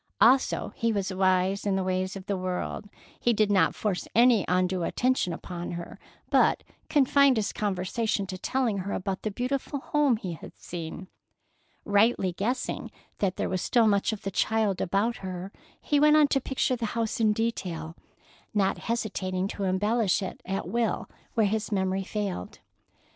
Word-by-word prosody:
Also, 260 +3 +3
he 230 0 +1
was 200 -2 -1
wise 185 +1 +2
in 200 -2 +1
the 190 - 0
ways 185 +1 -1
of 190 -1 -8
the 200 - -1
world, 185 +2 -4 0.3
he 240 - +2
did 215 -1 +2
not 185 -5 +3
force 200 -4 -2
any 235 -3 +6
undue 180 0 +1
attention 250 +1 +1
upon 175 +1 -6
her, 170 0 -7 0.3
but - - +4 0.3
confined 280 -2 +4
his 210 -2 -1
conversation 205 +1 -1
to 185 - -6
telling 230 +1 -1
her 195 +2 -3
about 190 0 -3
the 215 - -2
beautiful 260 +6 -2
home 285 -3 +2
he 185 -5 -5
had 160 - -11
seen. 170 +1 -7 0.8
Rightly 205 -2 +3
guessing 240 +8 -2 0.3
that 190 -2 0
there - - -1
was 185 -1 -2
still 235 +2 +3
much 200 -1 +2
of 220 - -6
the 195 - -3
child 215 -1 +1
about 205 +6 0
her, 185 0 -6 0.3
he 290 - +1
went 300 +1 +6
on 300 -1 +6
to 270 - +2
picture 260 0 0
the 230 -2 -3
house 225 0 -1
in 220 -2 +4
detail, 180 -8 -3 0.6
not 195 -2 +2
hesitating 190 -5 -2
to 200 - -3
embellish 205 +2 +1
it 190 - -6
at 195 +1 -2
will 235 -2 -1 0.2
where 225 -2 +4
his 215 +2 -1
memory 190 -1 0
failed. 195 - -4
200 Hz, 170 wpm, -27 LUFS, 185-230 Hz, 0.8 s, any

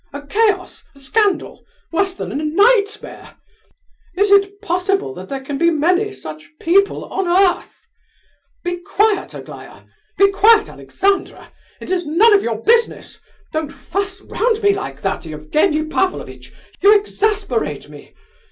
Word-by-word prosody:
A 285 0 -7
chaos, 400 +3 0
a - - -16
scandal, 405 +8 -1 0.3
worse 385 +2 0
than - - -6
a - - -6
nightmare! 420 +6 +1 0.8
Is 405 +1 +2
it 400 0 +3
possible 390 +3 -1
that - - -10
there 275 -1 -4
can 275 +1 -5
be 335 +1 +4
many 355 +6 +1
such 155 - -10
people 395 +4 +2
on 385 -1 -3
earth? 360 +1 +1 0.8
Be 355 0 -2
quiet, 400 +2 0
Aglaya! - - -11 0.3
Be 395 0 +5
quiet, 435 +3 +4
Alexandra! 395 0 -2 0.3
It - - -8
is 355 -4 -1
none 405 +9 +5
of 400 - +5
your 225 - -3
business! 470 +1 +1 0.3
Don't 315 -2 -2
fuss 395 +5 -5
round 450 0 -1
me 405 0 +5
like 395 - -6
that, - - -3
Evgenie 300 - 0
Pavlovitch; 365 +4 -3 0.3
you 410 +2 +7
exasperate 400 - -1
me! 145 -1 -15
390 Hz, 140 wpm, -18 LUFS, 310-405 Hz, 0.8 s, you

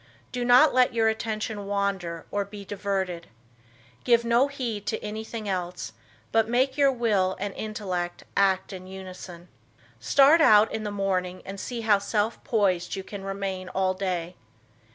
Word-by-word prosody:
Do 250 -1 -2
not 250 +5 +6
let 250 -1 +3
your 225 -1 +3
attention 215 -2 -3
wander 195 -5 -2
or 205 0 0
be 200 0 -10
diverted. 190 -4 -3 0.8
Give 235 -1 +3
no 235 +4 +4
heed 240 -7 -4
to - - -2
anything 220 +1 -5
else, 180 -2 -3 0.4
but 225 0 +2
make 260 +2 +2
your 280 -1 +4
will 210 -7 +1
and 200 0 -3
intellect 185 -5 -4
act 190 -1 +2
in 185 0 -8
unison. 185 -2 -9 0.5
Start 285 +4 +5
out 215 -6 +6
in 220 - -3
the 210 - -3
morning 185 -2 -2
and 195 +1 -7
see 240 +2 -4
how 215 -2 +4
self 210 +2 -1
poised 190 -6 +1
you 190 - -5
can 200 0 -8
remain 195 -1 -4
all 185 0 0
day. 180 -2 -3
200 Hz, 155 wpm, -26 LUFS, 185-225 Hz, 0.8 s, not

